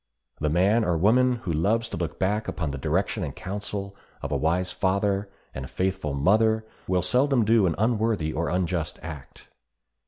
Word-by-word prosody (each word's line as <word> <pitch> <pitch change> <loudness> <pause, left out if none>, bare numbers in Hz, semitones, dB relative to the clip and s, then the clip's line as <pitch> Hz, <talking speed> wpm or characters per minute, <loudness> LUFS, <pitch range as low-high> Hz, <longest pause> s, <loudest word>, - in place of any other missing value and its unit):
The 75 - 0
man 100 +8 +3
or 85 -4 +1
woman 125 +8 +4
who 85 - -1
loves 110 +9 +1
to - - -5
look 85 -2 -3
back 105 +3 0
upon 75 -5 -2
the 70 - -5
direction 90 +7 0
and 70 -4 -5
counsel 100 0 -5 0.3
of - - -4
a - - +1
wise 90 +3 0
father 100 +1 0 0.2
and 65 0 -6
faithful 95 -6 -2
mother 110 +9 +3 0.2
will 90 -1 +1
seldom 130 +1 +3
do 110 -3 +4
an 80 - 0
unworthy 110 -7 +1
or 85 +2 -1
unjust 90 -3 -1
act. 75 -5 -10
95 Hz, 175 wpm, -26 LUFS, 80-110 Hz, 0.3 s, woman